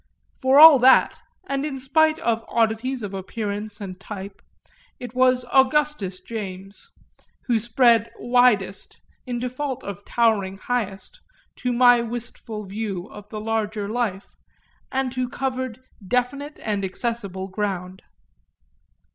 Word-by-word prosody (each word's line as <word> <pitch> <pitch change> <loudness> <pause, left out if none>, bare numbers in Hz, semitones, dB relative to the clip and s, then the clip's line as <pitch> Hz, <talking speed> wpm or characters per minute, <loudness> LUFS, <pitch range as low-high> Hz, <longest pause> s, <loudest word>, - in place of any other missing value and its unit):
For 265 +1 +5
all 310 -3 +10
that, 260 +2 +5 0.3
and 275 0 -1
in 285 -3 -4
spite 315 +4 +3
of 230 -5 -1
oddities 230 +2 0
of 200 -1 -5
appearance 205 +2 -5
and 185 -3 -7
type, 195 0 -8 0.6
it 245 -2 -8
was 255 0 +3
Augustus 265 -8 +2
James 195 -3 -7 0.6
who 235 -3 +2
spread 235 0 +3
widest, 240 -6 +1 0.3
in 245 -1 -2
default 255 +2 -4
of 200 0 -7
towering 205 -5 +1
highest, 230 - -4 0.4
to 250 - -2
my 245 0 +5
wistful 230 -2 -6
view 200 -2 -5
of 205 0 -12
the 215 - -6
larger 215 -1 -2
life, 215 -4 -3 0.6
and 260 -1 -1
who 255 -1 -2
covered 255 -2 -3 0.3
definite 275 +4 -1
and 205 -2 -1
accessible 195 -2 -4
ground. 190 -2 -4
230 Hz, 120 wpm, -23 LUFS, 200-255 Hz, 0.6 s, all